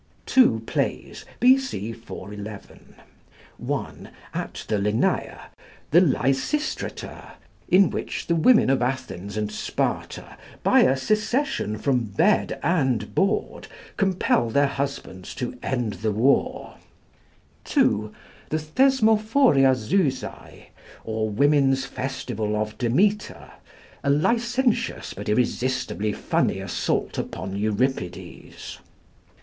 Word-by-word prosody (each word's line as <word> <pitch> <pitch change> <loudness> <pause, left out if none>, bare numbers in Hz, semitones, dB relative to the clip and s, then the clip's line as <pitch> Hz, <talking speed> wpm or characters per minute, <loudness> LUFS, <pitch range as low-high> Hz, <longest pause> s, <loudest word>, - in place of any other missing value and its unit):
Two 245 - +4
plays, - - -3
B.C. 250 - +2
411: 105 -2 -10 0.6
(1) - - -4 0.2
at - - -5
the 110 - 0
Lenæa, 105 +2 0 0.5
'The 170 +4 +7
Lysistrata,' 140 - -1 0.4
in 190 +2 +5
which - - -4
the 170 - +1
women 170 - +5
of 135 - +1
Athens 125 -6 -3
and 105 0 -2
Sparta - - -3 0.3
by - - +5
a 135 - +4
secession 215 - 0
from 130 +2 +1
bed 100 -1 +1
and 130 - 0
board 195 +2 -1 0.3
compel 185 - +1
their 140 +5 +3
husbands 135 -10 -4
to 125 -1 -4
end 120 -5 -2
the 110 +1 -2
war; 120 +7 +1 0.9
(2) 105 0 +1 0.4
The 155 - 0
'Thesmophoriazusæ' 200 - +2 0.4
or 110 -1 -2
Women's 135 +2 +3
Festival 125 -5 -3
of 105 0 -2
Demeter, 200 - 0 0.5
a 140 - 0
licentious 235 - +1
but 105 +2 -6
irresistibly 120 -1 0
funny - - 0
assault - - -2
upon 95 +3 -5
Euripides. 105 -2 -3
130 Hz, 100 wpm, -24 LUFS, -, 0.9 s, The